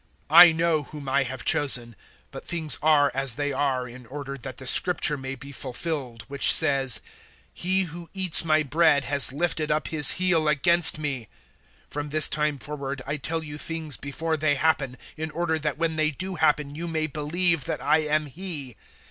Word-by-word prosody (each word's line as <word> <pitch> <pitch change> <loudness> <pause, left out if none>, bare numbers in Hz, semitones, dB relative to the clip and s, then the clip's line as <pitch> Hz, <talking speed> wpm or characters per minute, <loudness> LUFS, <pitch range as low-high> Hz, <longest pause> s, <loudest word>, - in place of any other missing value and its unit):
I 175 -1 +9
know 160 -1 0
whom 145 0 -11
I 135 +1 +1
have 130 0 -7
chosen, 120 -5 +2 0.4
but - - -10
things 160 -3 +1
are 150 -2 +3
as 135 -2 -2
they 145 0 -3
are 130 -2 -2
in 125 0 -13
order 140 +1 -7
that 130 -1 -10
the 130 - -10
Scripture 150 +2 +3
may 135 -1 -7
be 140 +2 -12
fulfilled, 130 -3 -5
which 140 0 +1
says, 135 -5 +3 0.5
`He 190 +2 -1
who 170 0 -10
eats 185 -5 +4
my 155 -1 +1
bread 150 0 +2
has 140 0 +5
lifted 155 +1 -2
up 150 0 -2
his 150 -3 +5
heel 175 -4 0
against 160 +3 +5
me.' 140 -7 -5 0.6
013:019 - - -18
From 145 0 -5
this 155 +1 +4
time 150 -1 0
forward 140 -2 -6
I 145 +2 -4
tell 160 +3 -4
you 150 -1 -9
things 160 -3 -4
before 160 +3 -4
they 150 -1 0
happen, 135 -4 -1 0.2
in 160 +1 -5
order 160 0 -2
that 150 -1 -4
when 160 -1 -2
they 155 -1 +1
do 185 +6 -7
happen 150 -3 0
you 165 +3 -6
may 160 -1 -2
believe 160 +1 -2
that - - -3
I - - +1
am 155 0 -1
He. 145 - -9
150 Hz, 190 wpm, -24 LUFS, 140-160 Hz, 0.6 s, I